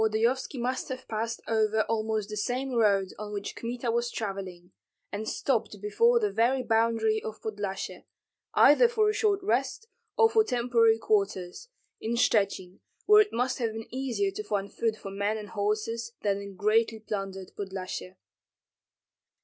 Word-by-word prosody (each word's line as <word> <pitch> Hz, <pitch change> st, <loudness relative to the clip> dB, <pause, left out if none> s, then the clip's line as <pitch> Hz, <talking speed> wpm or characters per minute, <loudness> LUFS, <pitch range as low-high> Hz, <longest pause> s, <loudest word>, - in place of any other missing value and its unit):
Volodyovski 230 Hz, +5 st, +1 dB
must 255 Hz, +2 st, -2 dB
have 260 Hz, 0 st, -6 dB
passed 225 Hz, +1 st, -3 dB
over 220 Hz, -1 st, +2 dB
almost 220 Hz, -1 st, -1 dB
the 210 Hz, -, -5 dB
same 250 Hz, +6 st, -2 dB
road 200 Hz, -5 st, +2 dB
on 210 Hz, 0 st, -6 dB
which 205 Hz, -1 st, -5 dB
Kmita 235 Hz, 0 st, -3 dB
was 235 Hz, +1 st, 0 dB
travelling, 190 Hz, -5 st, -6 dB, 0.4 s
and 215 Hz, +2 st, -3 dB
stopped 225 Hz, -5 st, -1 dB
before 465 Hz, -, +3 dB
the 420 Hz, -2 st, 0 dB
very 255 Hz, +3 st, +2 dB
boundary 225 Hz, -1 st, +2 dB
of 220 Hz, 0 st, -7 dB
Podlyasye, 205 Hz, -3 st, -5 dB, 0.5 s
either 385 Hz, +12 st, +7 dB
for 440 Hz, -2 st, +2 dB
a -, -, +1 dB
short 410 Hz, -3 st, +1 dB
rest 270 Hz, -, 0 dB, 0.3 s
or 450 Hz, -2 st, +7 dB
for 445 Hz, 0 st, +4 dB
temporary 235 Hz, -, +3 dB
quarters, 200 Hz, -, -1 dB, 0.3 s
in 230 Hz, +2 st, -2 dB
Shchuchyn, 195 Hz, -5 st, +1 dB, 0.3 s
where 425 Hz, 0 st, +8 dB
it 420 Hz, -, 0 dB
must 250 Hz, +2 st, -1 dB
have 230 Hz, -3 st, -1 dB
been 225 Hz, 0 st, -6 dB
easier 240 Hz, -7 st, -1 dB
to 210 Hz, -, -5 dB
find 200 Hz, -1 st, -3 dB
food 225 Hz, -1 st, -1 dB
for 195 Hz, -, -8 dB
men 200 Hz, +2 st, -1 dB
and 210 Hz, -1 st, -8 dB
horses 215 Hz, +3 st, -2 dB
than 200 Hz, -1 st, 0 dB
in 200 Hz, -1 st, -9 dB
greatly 220 Hz, +3 st, +2 dB
plundered 195 Hz, -3 st, -5 dB
Podlyasye. 190 Hz, -1 st, -6 dB
220 Hz, 155 wpm, -28 LUFS, 205-245 Hz, 0.5 s, where